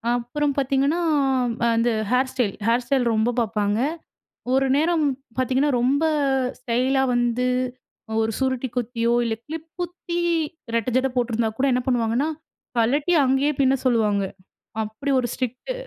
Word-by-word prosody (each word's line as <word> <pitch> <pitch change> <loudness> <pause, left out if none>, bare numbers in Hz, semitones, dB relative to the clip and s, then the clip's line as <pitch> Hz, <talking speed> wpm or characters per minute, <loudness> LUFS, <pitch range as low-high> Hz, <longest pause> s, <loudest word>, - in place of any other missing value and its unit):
அப்புறம் 265 +5 -1
பாத்தீங்கன்னா, 275 +4 +1 0.5
ம் - - -4 0.2
அந்த 230 +1 +2 0.2
ஹேர் 255 +1 +2
ஸ்டைல், 245 -7 0
ஹேர் 235 +2 +2
ஸ்டைல் 265 -2 +1
ரொம்ப 220 +2 +2
பாப்பாங்க. 210 -2 0 0.7
ஒரு 270 0 +3
நேரம் 320 +2 +2 0.3
பாத்தீங்கன்னா, 260 +3 +2
ரொம்ப 275 +5 +2 0.6
ஸ்டைலா 255 +2 +1
வந்து, 240 +1 +1 0.7
அ - - -2
ஒரு 220 0 0
சுருட்டி 260 -1 0
குத்தியோ! 235 -1 0
இல்ல 225 -1 -1
கிளிப் 320 +1 -7
குத்தி 350 0 -4 0.6
ரெட்ட 230 +1 0
ஜட 260 +1 +2
போட்டிருந்தா 235 -2 +1
கூட 275 - +3
என்ன 250 - +1
பண்ணுவாங்கன்னா, 245 +3 +1 0.5
கழட்டி 280 +9 +2
அங்கேயே 270 +3 +2
பின்ன 265 0 +4
சொல்லுவாங்க. 215 -5 +2 0.6
அப்பிடி 220 +7 -4
ஒரு 240 - -1
ஸ்ட்ரிக்ட்டு 255 - -4
255 Hz, 135 wpm, -23 LUFS, 230-275 Hz, 0.7 s, பின்ன